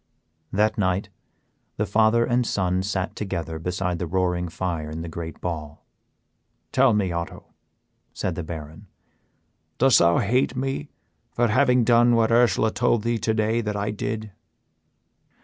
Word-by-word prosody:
That 105 +2 +1
night 95 0 0 0.7
the - - 0
father 110 +2 +3
and 125 +1 +1
son 95 -5 0
sat 95 0 -3
together 85 -5 -4
beside 90 +1 -2
the 90 - -3
roaring 90 0 0
fire 80 -3 -3
in 80 +1 -5
the - - -6
great 80 0 -7
ball. 75 -4 -6 0.9
"Tell 130 -4 +4
me, 95 -4 0
Otto," 85 0 -6 0.6
said - - -3
the - - -4
Baron, 80 +3 -8 0.9
"dost 135 -1 +5
thou 85 0 +4
hate 125 +5 +1
me 135 +3 -3 0.4
for 120 -1 +1
having 125 +1 +3
done 120 +1 +4
what 115 0 +2
Ursela 115 -2 +3
told 120 -3 +1
thee 115 0 0
today 110 +1 +1
that 105 -2 -3
I 105 +1 -1
did?" 110 0 -4
105 Hz, 145 wpm, -24 LUFS, 90-115 Hz, 0.9 s, dost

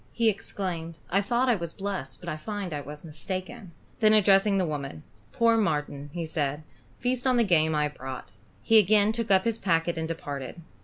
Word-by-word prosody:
He 230 -1 +3
exclaimed: 175 -5 -4
"I 195 +3 +3
thought 240 +5 +1
I 245 - +5
was 170 -6 -4
blessed, 195 -9 -4
but - - -10
I - - -2
find 195 +2 -5
I 145 - -3
was 150 +1 -9
mistaken." 185 +6 -5 0.3
Then 215 -1 +5
addressing 200 -1 +5
the 185 - +2
woman, 140 - -5 0.3
"Poor 230 -1 +3
Marten," 150 -7 -1 0.2
said 150 -1 -2 0.3
he, - - -27
"feast 250 +1 0
on 255 -1 +3
the 235 - +5
game 160 -6 +3
I 150 - +2
have 150 0 -3
brought." 130 -6 -7 0.3
He 225 - +6
again 210 +1 +4
took 230 -1 -3
up 190 -1 +5
his 230 -1 0
packet 165 -2 +1
and 160 - -2
departed. 145 -3 -5
185 Hz, 200 wpm, -27 LUFS, 155-215 Hz, 0.3 s, He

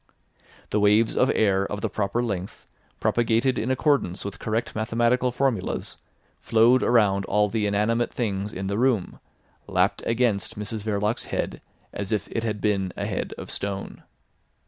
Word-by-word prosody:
The 105 - +2
waves 105 +2 +4
of 130 - +3
air 100 -3 +3
of 105 0 -3
the - - 0
proper 105 +3 -1
length, 100 -5 -4 0.3
propagated 120 +2 +2
in 115 - -2
accordance 130 - +1
with 100 -2 -6
correct 110 +1 -2
mathematical 120 +3 +1
formulas, 125 -6 -1 0.4
flowed 115 +3 +4
around 105 -5 +3
all 105 0 +2
the 105 -1 0
inanimate 110 +4 +1
things 105 -3 -2
in 95 -1 -5
the 100 +2 -1
room, 120 -7 +1 0.5
lapped - - +1
against 115 -5 0
Mrs 105 +1 -4
Verloc's 105 +1 -1
head - - -3 0.3
as 100 0 -4
if 105 - -1
it 115 - -1
had 110 -2 -2
been 95 -3 0
a - - -2
head - - -3
of - - -7
stone. 100 -1 -4
110 Hz, 155 wpm, -25 LUFS, 100-120 Hz, 0.5 s, waves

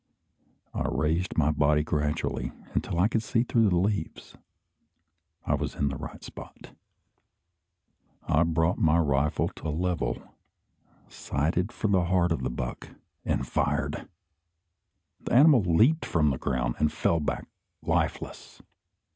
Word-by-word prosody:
I - - -2
raised 85 +5 -1
my 75 -1 +3
body 75 0 +2
gradually 75 +1 -2 0.2
until - - -2
I 95 - +5
could 115 0 0
see 115 +1 +1
through 115 -3 +2
the 90 - +1
leaves. 100 +3 -2 1.1
I - - +1
was - - -2
in 70 - 0
the 70 - -4
right - - -8
spot. - - -11 1.5
I 75 - +2
brought 80 +1 +1
my 80 +1 +4
rifle 75 -1 +1
to - - -8
a - - -1
level, 90 +3 -1 0.9
sighted 85 - -1
for 115 - -2
the 95 -4 +2
heart 90 -1 +2
of 80 - 0
the 65 - -1
buck, - - -6 0.3
and 65 - 0
fired. 75 +2 -1 1.1
The - - -5
animal 140 0 +7
leaped 110 - +3
from 75 -3 +2
the 65 - -3
ground, 60 -2 -1
and 75 - +2
fell 85 - +1
back 75 - -3 0.4
lifeless. - - -2
80 Hz, 140 wpm, -27 LUFS, 75-95 Hz, 1.5 s, animal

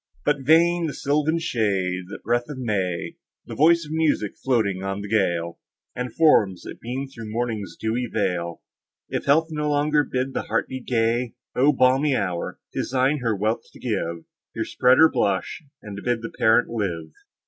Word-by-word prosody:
But, 145 - +2
vain 165 +4 +4
the 150 - -5
sylvan 150 +3 +1
shade—the 95 - -1
breath 120 +4 0
of 145 - -6
May, 95 -8 -2 0.3
The - - -8
voice 165 +2 +4
of 150 - -10
music 155 -10 0
floating 110 -8 0
on 95 +1 -3
the 100 - -6
gale, 85 -5 0 0.4
And 125 -1 -4
forms, 105 - +4
that - - -9
beam 130 +4 -4
through 115 -5 -9
morning's 110 -3 -3
dewy 120 +3 -1
veil, 85 -5 -2 0.5
If - - -3
health 160 +4 +3
no 150 -1 -1
longer 150 0 +2
bid 130 -1 -2
the - - -1
heart - - 0
be 130 - -5
gay! 120 0 0 0.2
O 135 +4 +5
balmy 135 +1 +3
hour! 90 -6 -2 0.2
'tis - - -2
thine 135 +3 +2
her 115 -4 0
wealth 110 +3 -1
to - - -14
give, 85 -8 -3 0.3
Here - - -2
spread 125 +1 +3
her 160 - +8
blush, 100 - -1 0.2
and 100 -1 -7
bid 120 -2 -1
the 115 - -6
parent 110 +2 +3
live! 85 -9 -3
120 Hz, 175 wpm, -24 LUFS, 100-140 Hz, 0.5 s, her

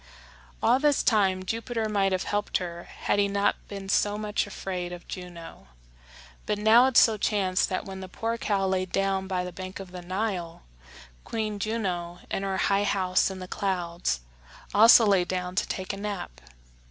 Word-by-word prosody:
All 255 - +4
this 295 -1 +3
time 190 -5 +2
Jupiter 230 +2 -2
might 200 -2 +1
have 185 -1 0
helped 205 0 -1
her 175 -1 -6
had - - -1
he 200 - +3
not 200 0 +1
been 195 -1 -7
so 205 +1 +2
much 210 -1 -1
afraid 180 -3 -5
of 175 0 -9
Juno. 175 - -9 0.8
But 210 - 0
now 220 +4 +6
it 265 - +1
so 220 -2 +6
chanced 195 -3 +1
that 185 - -2
when 190 -1 -7
the 190 - -7
poor 225 +5 -3
cow 200 -3 0
lay 185 -1 0
down 195 0 0
by 185 -2 -1
the 180 - -5
bank 185 +2 -7
of 190 -2 -9
the 180 -1 -7
Nile, 185 -2 -3 0.6
Queen 215 -2 -3
Juno, 185 -6 -2
in - - -1
her 195 -1 -2
high 200 +1 +2
house 190 -2 +2
in 190 - -6
the 185 -1 -7
clouds, 175 - -2 0.5
also 225 +2 +8
lay 195 -3 +4
down 180 0 -3
to 185 - 0
take 190 +1 -4
a - - -6
nap. 195 - -5
195 Hz, 180 wpm, -27 LUFS, 185-210 Hz, 0.8 s, also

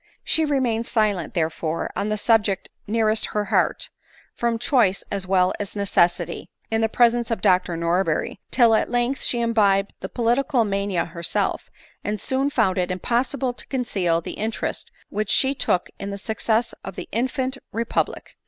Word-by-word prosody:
She 320 - +2
remained 245 -6 0
silent, 210 -7 0
therefore, 160 -1 -1
on 205 - -1
the 215 - 0
subject 210 -3 +2 0.2
nearest 220 0 +1
her 210 0 0
heart, - - +1 0.4
from 235 -1 0
choice 230 -6 +2
as 195 -2 -2
well 185 -1 +3
as 205 0 -5
necessity, 195 -4 +1 0.2
in 225 0 +1
the 225 - +2
presence 240 0 +3
of 230 - -1
Dr 180 -2 +2
Norberry, 170 +3 0
till 235 -3 +5
at 220 - +2
length 245 +2 0
she 240 - +1
imbibed 205 -4 +2
the - - -6
political 245 +1 +1
mania 200 -3 0
herself 170 0 -2 0.3
and 210 0 -2
soon 265 +5 0
found 205 -8 +1
it 180 0 0
impossible 245 +7 0
to - - -8
conceal 195 -10 0
the - - -6
interest 220 +1 -3 0.2
which 215 -1 -2
she 265 0 +3
took 180 -9 0
in 200 - -4
the 200 - -4
success 220 +2 0
of 195 - -7
the - - -6
infant 260 +3 -1
repub 230 +1 0
lic. - - -12
220 Hz, 165 wpm, -23 LUFS, 195-240 Hz, 0.4 s, till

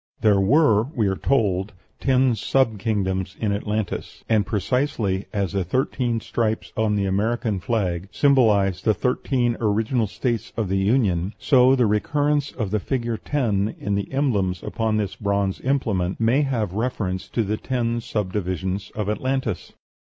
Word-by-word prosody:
There 105 -3 +4
were, 110 -1 +4
we 110 - +1
are 95 -1 +1
told, 100 -5 0 0.3
ten 130 -1 +3
sub 115 -1 +1
kingdoms 95 -3 -1
in 105 -2 0
Atlantis; 105 -1 -3
and 105 -3 +2
precisely 105 -2 -1
as 100 -4 -1
the 100 -1 0
thirteen 120 - 0
stripes 110 -1 -2
on 110 -1 +1
the 100 -1 0
American 105 +2 0
flag 95 -2 -2
symbolize 105 -10 +3
the 110 -2 +2
thirteen 125 +2 0
original 110 +2 +1
States 115 +2 -3
of 110 -5 -1
the 95 +1 +1
Union, 100 -3 +1
so 130 -1 +5
the 125 -2 +3
recurrence 145 +7 +1
of 110 -6 -4
the 105 - +1
figure 120 0 -2
ten 110 -7 -1
in 100 - -2
the 100 0 -2
emblems 105 -10 0
upon 110 -1 -1
this 100 -2 -2
bronze 100 -2 -1
implement 110 -9 0
may 115 +5 +3
have 115 -10 -1
reference 105 -5 -2
to 115 - 0
the 105 +1 -2
ten 120 -2 -1
subdivisions 95 -2 -3
of 105 -2 -2
Atlantis. 125 -2 -2
110 Hz, 150 wpm, -23 LUFS, 100-125 Hz, 0.3 s, so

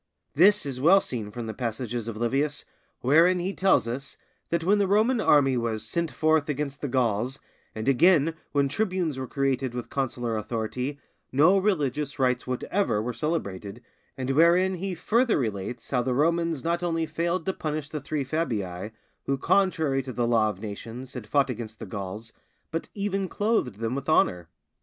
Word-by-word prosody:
This 200 +5 +5
is 130 -2 -4
well 180 +7 +7
seen 115 - -3
from 115 +2 -6
those 110 -1 -6
passages 120 -1 -3
of 115 -2 -5
Livius 135 +6 -1 0.4
wherein 165 +8 +5
he 180 +3 -2
tells 190 -11 +3
us 130 +4 -5 0.3
that 170 -1 0
when 205 +4 +3
the 200 - +2
Roman 220 +5 +3
army 135 -7 +4
was 110 -2 -2
'sent 170 +6 -1
forth 155 -1 +1
against 145 -1 -3
the 145 - -2
Gauls, 125 0 0 0.4
and 110 +2 -4
again 160 +3 +4 0.2
when 140 -1 +2
tribunes 180 -3 -1
were 130 - -4
created 135 -3 -1
with 125 - -5
consular 120 -4 -2
authority, 120 +6 -3 0.3
no 155 +8 +5
religious 150 -8 0
rites 125 -2 +1
whatever 130 - 0
were 120 +3 -2
celebrated, 110 - -3 0.3
and 130 0 -2
wherein 170 +6 +4
he 185 +1 -3
further 230 +7 +2
relates 115 0 -4
how 125 -2 +2
the 125 0 -1
Romans 165 +1 +1
not 170 +1 0
only 165 -2 0
failed 170 +3 -2
to 190 - 0
punish 155 -3 -4
the 150 -2 -5
three 145 +1 -2
Fabii, 105 - -2 0.4
who 135 - +1
contrary 160 -4 +2
to 130 0 -7
the 120 -1 -1
law 115 -2 +3
of 100 -3 -6
nations 115 +5 -7
had 125 -5 -7
fought 140 -2 +2
against 115 -2 -7
the - - -7
Gauls, 100 +3 -6 0.4
but 165 - -3
even 195 -1 -1
clothed 205 - 0
them 115 +3 -3
with 140 +2 -4
honour. 90 - +2
135 Hz, 175 wpm, -26 LUFS, 120-170 Hz, 0.4 s, well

